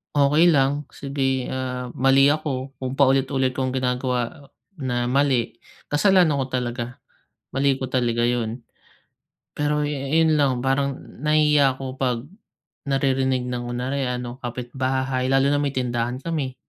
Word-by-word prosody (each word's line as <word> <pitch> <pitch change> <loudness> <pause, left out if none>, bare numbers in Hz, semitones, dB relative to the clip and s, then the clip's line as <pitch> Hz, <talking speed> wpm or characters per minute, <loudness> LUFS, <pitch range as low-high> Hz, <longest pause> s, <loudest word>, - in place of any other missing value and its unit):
Okey 150 +4 +5
lang. 145 -1 +1
Sige, 135 -2 -2
ah, 125 -1 -4
mali 135 +1 +4
ako 140 -3 -4
kung 130 +1 -4
paulit-ulit 135 -1 +2
kong 130 0 -1
ginagawa 125 +1 -2 0.3
na 120 -2 -1
mali, 130 -2 +1 0.3
kasalanan 170 -2 +3
ko - - -1
talaga, 125 -1 -3 0.6
mali 135 0 +2
ko 130 - -3
talaga 120 -2 +1
yun. 120 -1 -1 1.0
Pero 150 0 0
yu 150 - -2 0.2
yun 160 0 +4
lang, 140 -4 +2
parang 135 +2 0 0.2
nahihiya 150 -3 +3
ako 130 -1 -5
'pag 130 -3 0 0.6
naririnig 135 -2 0
ng 125 -1 -3
kunyari 125 +3 -3
ano, 125 +1 -5
kapitbahay 130 +1 -2
lalo 135 +1 +3
na 145 - +1
may 140 - 0
tindahan 125 -2 -2
kami. 140 -3 -3
130 Hz, 135 wpm, -23 LUFS, 125-140 Hz, 1.0 s, Okey